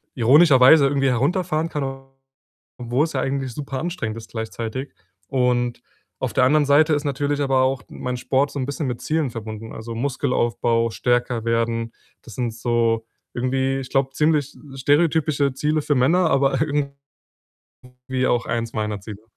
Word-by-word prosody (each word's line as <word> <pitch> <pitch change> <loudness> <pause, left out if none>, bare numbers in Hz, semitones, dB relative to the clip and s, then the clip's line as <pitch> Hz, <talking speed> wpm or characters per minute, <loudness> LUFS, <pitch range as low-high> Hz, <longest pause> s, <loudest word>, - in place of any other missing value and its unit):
ironischerweise 140 +2 +6
irgendwie 135 -1 +1
herunterfahren 160 +5 0
kann, 150 -3 -3 0.9
obwohl's 125 +6 -1
ja 130 - -1
eigentlich 135 -2 -2
superanstrengend 140 -4 -4
ist 110 - -11
gleichzeitig 115 +3 -5 0.3
und 125 -2 0 0.4
auf 130 - -2
der 130 - +3
anderen 150 +2 +3
Seite 150 +3 +4
ist 145 0 0
natürlich 145 +1 -1
aber 135 -2 +2
auch 130 0 0
mein 125 0 -4
Sport 135 +3 0
so 140 - -5
'n 130 - -1
bisschen 140 0 -3
mit 120 -1 -4
Zielen 155 -3 0
verbunden: 110 -1 -7
„Also, 115 +1 -7
Muskelaufbau, 120 -3 0
stärker 120 -1 0
werden.“ 115 0 0 0.3
Das 115 - -12
sind 120 -3 -2
so 115 -1 0 0.3
irgendwie, 130 +2 0
ich 125 - -9
glaube, 135 -1 +1
ziemlich 150 -2 +1 0.2
stereotypische 145 0 +2
Ziele 150 +3 0
für 145 0 0
Männer, 160 +7 +3
aber 135 +1 +2
irgendwie 140 -2 -3 1.1
auch 120 0 +1
eins 115 0 -3
meiner 105 -2 -2
Ziele. 105 0 -10
130 Hz, 150 wpm, -22 LUFS, 120-145 Hz, 1.1 s, ironischerweise